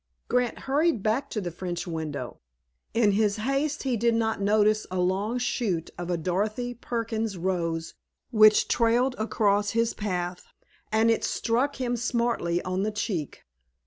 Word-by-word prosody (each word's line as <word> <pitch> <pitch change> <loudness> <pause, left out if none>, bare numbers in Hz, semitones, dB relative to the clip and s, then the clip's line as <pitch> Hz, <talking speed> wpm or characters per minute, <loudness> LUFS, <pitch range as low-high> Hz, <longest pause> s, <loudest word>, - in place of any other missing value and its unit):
Grant 250 -1 +1
hurried 285 - +1
back 230 +6 0
to 220 - -2
the 180 -4 -4
French 175 +1 -4
window. 155 -7 -5 0.6
In 225 -3 +4
his 205 0 +2
haste 275 +6 -1
he 260 -3 0
did 235 +1 +2
not 225 -2 0
notice 215 +1 +3
a 185 - -3
long 195 +6 0
shoot 235 -9 -1
of 175 0 -6
a 175 - +1
Dorothy 210 +8 -1
Perkins 225 -3 -3
rose 165 -2 -2 0.4
which 215 -2 +6
trailed 240 +2 +2
across 205 -2 +1
his 230 0 +2
path, 180 -3 -3 0.4
and 220 +1 +4
it 225 - 0
struck 250 +5 0
him 245 -2 -1
smartly 235 -7 0
on 185 +1 -1
the 210 - 0
cheek. 205 - -3
215 Hz, 150 wpm, -27 LUFS, 185-235 Hz, 0.6 s, which